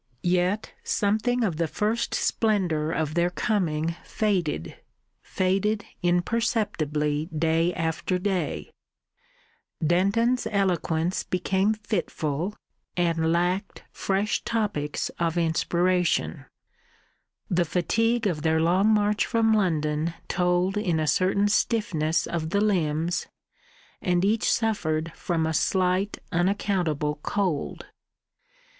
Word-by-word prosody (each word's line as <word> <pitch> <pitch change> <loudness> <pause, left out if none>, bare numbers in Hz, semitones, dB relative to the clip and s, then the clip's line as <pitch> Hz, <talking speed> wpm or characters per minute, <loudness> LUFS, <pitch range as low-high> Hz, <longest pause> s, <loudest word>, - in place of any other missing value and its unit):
Yet 180 +4 +1
something 220 +4 +1
of 180 -8 0
the 165 0 +1
first 215 +8 -1
splendour 180 -8 +1
of 155 -2 -1
their 175 +1 +2
coming 170 -5 -1
faded 175 - -1 0.5
faded 195 +3 0 0.2
imperceptibly 175 - 0
day 165 +1 +1
after 165 +2 -1
day; 185 -1 -2 1.1
Denton's 205 +9 +2
eloquence 180 -4 0
became 190 +3 0
fitful, 190 -4 -2 0.4
and 165 -2 +1
lacked 180 +3 -1
fresh 200 +3 -1
topics 205 -11 -1
of 170 0 0
inspiration; 175 +2 +1 1.0
the 175 -4 +2
fatigue 225 +8 +1
of 170 -7 0
their 160 0 +2
long 180 +5 +3
march 210 -1 +2
from 225 -1 +3
London 160 -5 0
told 180 +2 +1
in 175 -6 0
a 155 - 0
certain 195 +5 +2
stiffness 195 -8 +1
of 160 -2 -3
the 200 - +1
limbs, 175 -4 0 0.7
and 180 0 +1
each 215 +2 +2
suffered 165 -8 0
from 165 -2 -1
a 160 - -1
slight 185 +4 +1
unaccountable 175 -5 0
cold. 180 -7 -2
180 Hz, 100 wpm, -26 LUFS, 160-205 Hz, 1.1 s, long